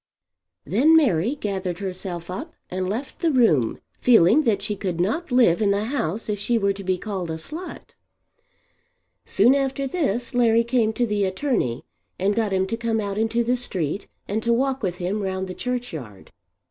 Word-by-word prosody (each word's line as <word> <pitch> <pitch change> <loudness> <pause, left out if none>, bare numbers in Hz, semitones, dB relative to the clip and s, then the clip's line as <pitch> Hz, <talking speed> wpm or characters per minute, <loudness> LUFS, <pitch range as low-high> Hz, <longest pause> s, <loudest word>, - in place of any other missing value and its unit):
Then 275 - +4
Mary 240 - +3
gathered 190 - -3
herself 180 -2 -5
up 310 - -6 0.2
and 185 0 -2
left 245 +7 -4
the 335 - +2
room, 195 - +3 0.2
feeling 230 - +5
that 200 -3 +1
she 210 0 -2
could 185 -4 -3
not 285 - -1
live 235 -8 +4
in 205 - +3
the 200 +1 +1
house 225 - -2
if 210 -2 -2
she 235 +3 +1
were 200 -2 +1
to 195 0 -8
be 185 -1 0
called 190 -3 -4
a 160 - -2
slut. 310 - -8 1.4
Soon 250 - +5
after 275 0 0
this 260 - -1
Larry 230 -2 +4
came 235 -2 +1
to 240 - +1
the 210 -3 0
attorney 190 - -1 0.3
and 195 +2 +1
got 220 -1 0
him 190 0 +1
to 230 +4 -3
come 230 -1 -1
out 200 -1 -2
into 225 +2 +1
the 245 +2 +1
street 190 - -3 0.2
and 210 +2 -1
to 235 - 0
walk 265 +3 +1
with 180 -4 -2
him 185 +4 -2
round 190 -1 -2
the 185 - -5
churchyard. 165 - -5
210 Hz, 185 wpm, -23 LUFS, 185-245 Hz, 1.4 s, feeling